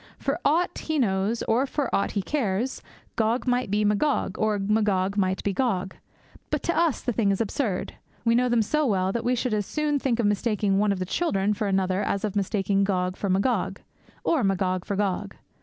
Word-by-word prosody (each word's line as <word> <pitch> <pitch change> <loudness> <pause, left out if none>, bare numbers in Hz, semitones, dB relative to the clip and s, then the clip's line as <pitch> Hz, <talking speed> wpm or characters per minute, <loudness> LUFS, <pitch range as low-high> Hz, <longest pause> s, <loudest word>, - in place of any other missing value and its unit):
For 275 +4 -2
aught 335 +5 +1
he 315 -1 -2
knows, 210 -2 +1
or 250 +5 +1
for 290 0 -2
aught 200 - +1
he 200 - -1
cares, 245 -3 -1 0.3
Gog 225 +2 +1
might 250 -3 +1
be 210 +1 +1
Magog, 210 0 +1
or 215 -1 +1
Magog 200 -2 +1
might 190 -2 0
be 200 - 0
Gog. 190 -5 -1 0.5
But - - -1
to 340 - 0
us 335 -5 +2
the 245 - -1
thing 215 -2 +1
is 195 - +1
absurd. 225 -2 -2 0.3
We 230 - +4
know 250 +1 +3
them 235 -2 +3
so 305 +8 +1
well 190 -3 +1
that 235 +2 -2
we 250 +1 +2
should 245 -1 -1
as 205 -2 -1
soon 300 -1 0
think 245 -3 0
of 235 - +2
mistaking 205 -1 +1
one 210 0 +3
of 200 - 0
the 185 - -2
children 200 - 0
for 210 0 -2
another 190 0 +1
as 200 - -1
of 210 - -4
mistaking 200 0 +1
Gog 185 -2 0
for 200 - -3
Magog, 195 0 0 0.4
or 315 -7 +2
Magog 185 -2 0
for 200 - -2
Gog. 200 0 -1
210 Hz, 205 wpm, -25 LUFS, 195-245 Hz, 0.5 s, We